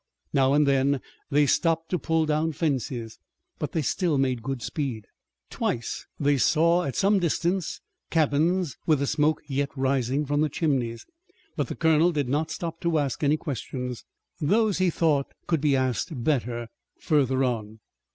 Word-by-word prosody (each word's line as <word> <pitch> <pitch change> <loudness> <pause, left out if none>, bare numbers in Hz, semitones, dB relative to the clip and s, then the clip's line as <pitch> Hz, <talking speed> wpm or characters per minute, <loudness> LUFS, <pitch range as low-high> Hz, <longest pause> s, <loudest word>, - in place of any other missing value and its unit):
Now 135 0 +3
and 150 +1 +4
then 140 0 +2 0.3
they 145 +1 +4
stopped 165 +2 +1
to 180 - +1
pull 160 -1 +1
down 155 +1 0
fences, 130 -7 -2 0.4
but - - -3
they 160 - 0
still 165 +1 +1
made 130 -3 0
good 135 0 -4
speed. 130 -9 -3 0.5
Twice 115 - -3
they 145 -1 +3
saw 170 +5 +3
at 135 - -3
some 200 +1 +3
distance 175 +1 -1 0.3
cabins 160 +2 +1
with 155 -2 +4
the 140 - 0
smoke 150 +2 +1
yet 140 0 -1
rising 135 +1 +1
from 145 +1 0
the 155 - +2
chimneys, 130 -7 -1 0.5
but - - -1
the - - -5
colonel 160 +1 +3
did 145 -6 -1
not 150 +4 0
stop 165 0 -5
to 170 -2 +1
ask 145 -1 -1
any 145 +2 +3
questions. 125 -4 -5 0.4
Those 210 +5 +2
he 185 -1 +3
thought 155 -4 0
could 165 -4 0
be 145 -2 +3
asked 130 - -1
better 120 -4 -1 0.3
further 135 -3 +2
on. 110 -3 -2
145 Hz, 160 wpm, -26 LUFS, 130-160 Hz, 0.5 s, and